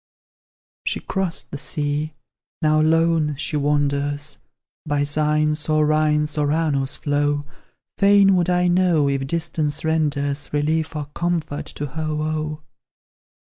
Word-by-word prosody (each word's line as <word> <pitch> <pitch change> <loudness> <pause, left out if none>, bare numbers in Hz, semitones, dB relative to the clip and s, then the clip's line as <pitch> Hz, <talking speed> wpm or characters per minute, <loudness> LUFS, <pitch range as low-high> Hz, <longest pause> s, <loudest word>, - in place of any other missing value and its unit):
She - - -1
crossed 190 -4 -3
the 145 - -5
sea 150 0 -2 0.5
now 155 0 +4
lone 160 -1 +2
she 145 +2 -2
wanders 145 0 0 0.4
By 145 -1 0
Seine's, 150 +1 +1
or 155 0 +3
Rhine's, 150 0 +1
or 145 -1 +1
Arno's 145 -4 0
flow; 145 0 0 0.5
Fain 200 -1 +6
would 180 -1 +1
I 180 0 +2
know 175 -4 +3
if 135 -1 -1
distance 160 -2 -2
renders 145 -3 0
Relief 155 +2 0
or 150 -1 -3
comfort 170 -4 -2
to 145 - -5
her 155 +2 -3
woe. 155 0 -3
150 Hz, 125 wpm, -22 LUFS, 145-160 Hz, 0.5 s, Fain